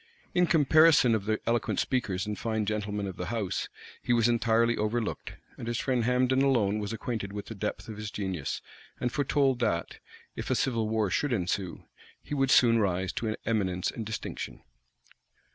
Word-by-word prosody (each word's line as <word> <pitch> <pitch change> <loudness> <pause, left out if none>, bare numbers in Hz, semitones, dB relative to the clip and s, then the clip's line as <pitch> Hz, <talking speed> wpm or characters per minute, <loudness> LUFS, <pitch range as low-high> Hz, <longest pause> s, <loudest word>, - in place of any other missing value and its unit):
In 180 0 +3
comparison 155 -4 +5
of 105 -3 0
the 110 0 0
eloquent 115 0 0
speakers 105 -6 -1
and 105 0 -3
fine 110 -2 -1
gentlemen 105 -1 -2
of 95 -2 -6
the 90 - -4
house, 105 -3 -2 0.3
he 120 - +1
was 115 -1 +4
entirely 115 0 +3
overlooked; 110 +1 -2 0.3
and 115 - -6
his 120 -1 -1
friend 125 -3 0
Hambden 125 +1 +3
alone 110 -7 +2
was 105 0 -3
acquainted 110 -2 -4
with 105 0 -6
the - - -7
depth 105 +2 -4
of 110 -2 -7
his 105 0 -5
genius, 95 -9 -3 0.4
and 125 - -1
foretold 140 -2 +1
that, 85 -8 -1 0.4
if - - -5
a - - +2
civil 115 -4 0
war 110 -3 +1
should 145 +8 0
ensue, 95 -3 -2 0.4
he - - -8
would 135 -2 +1
soon 115 -3 +6
rise 95 -2 0
to 110 -2 -2
eminence 95 -5 0
and 115 - -5
distinction. 110 - -5
110 Hz, 180 wpm, -29 LUFS, 105-125 Hz, 0.4 s, soon